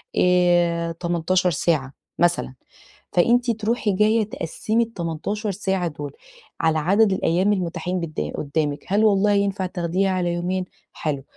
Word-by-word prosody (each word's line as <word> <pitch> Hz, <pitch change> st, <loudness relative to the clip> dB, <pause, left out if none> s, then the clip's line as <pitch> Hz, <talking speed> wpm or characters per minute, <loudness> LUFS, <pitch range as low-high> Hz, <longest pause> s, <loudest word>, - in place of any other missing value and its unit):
آآ 175 Hz, -2 st, +3 dB
18 175 Hz, +2 st, 0 dB
ساعة 145 Hz, -4 st, 0 dB, 0.3 s
مثلًا، 175 Hz, -5 st, +1 dB, 0.6 s
فأنتِ 240 Hz, +7 st, +3 dB
تروحي 220 Hz, 0 st, -1 dB
جايّة 215 Hz, +3 st, +3 dB
تقسّمي 215 Hz, +3 st, -1 dB
ال18 205 Hz, +1 st, -3 dB
ساعة 190 Hz, -2 st, -1 dB
دول 145 Hz, -2 st, -6 dB, 0.5 s
على 160 Hz, -1 st, +2 dB
عدَد 195 Hz, +6 st, +3 dB
الأيام 185 Hz, +3 st, +2 dB
المُتاحين 180 Hz, -1 st, -2 dB
بد 155 Hz, -, -4 dB
قُدّامِك، 145 Hz, 0 st, -2 dB
هل 205 Hz, +3 st, +2 dB
والله 205 Hz, 0 st, +4 dB
ينفَع 200 Hz, -1 st, 0 dB
تاخديها 180 Hz, +1 st, -1 dB
على 180 Hz, -2 st, 0 dB
يومين؟ 180 Hz, +2 st, -2 dB, 0.3 s
حلو، 140 Hz, -3 st, -3 dB
180 Hz, 125 wpm, -23 LUFS, 165-200 Hz, 0.6 s, والله